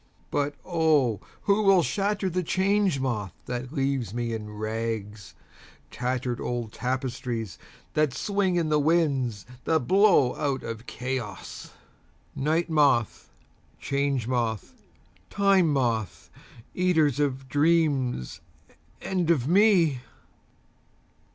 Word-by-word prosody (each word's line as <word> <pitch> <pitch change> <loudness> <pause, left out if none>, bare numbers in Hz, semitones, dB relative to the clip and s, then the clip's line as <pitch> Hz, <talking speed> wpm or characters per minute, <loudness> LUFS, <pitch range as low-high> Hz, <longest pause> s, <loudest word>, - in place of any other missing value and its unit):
(But 145 0 -1
O 155 - +2 0.2
who 200 +1 +3
will 195 -4 +5
shatter 200 +1 -1
the 185 0 -1
Change 190 -2 +1
Moth 110 -8 -2
that 125 +1 -5
leaves 135 - -1
me 120 -1 -2
in 110 -1 -5
rags—tattered 110 - -5
old 120 -3 -3
tapestries 125 - -3 0.3
that 155 -2 +2
swing 195 +4 0
in 165 -3 +1
the 150 -1 +3
winds 140 -9 +1 0.2
that 160 -1 +2
blow 190 -10 +4
out 140 -3 -1
of 115 +1 -7
Chaos!)Night 130 - -5
Moth, 145 -8 +2 0.5
Change 140 -4 -1
Moth, 115 -4 -2 0.6
Time 195 -5 +3
Moth, 115 -7 -1 0.4
eaters 160 -7 +2
of 135 -2 -1
dreams 145 - +1 0.6
and 180 -3 -1
of 140 -7 +2
me! 175 - +4
140 Hz, 100 wpm, -26 LUFS, 120-170 Hz, 0.6 s, will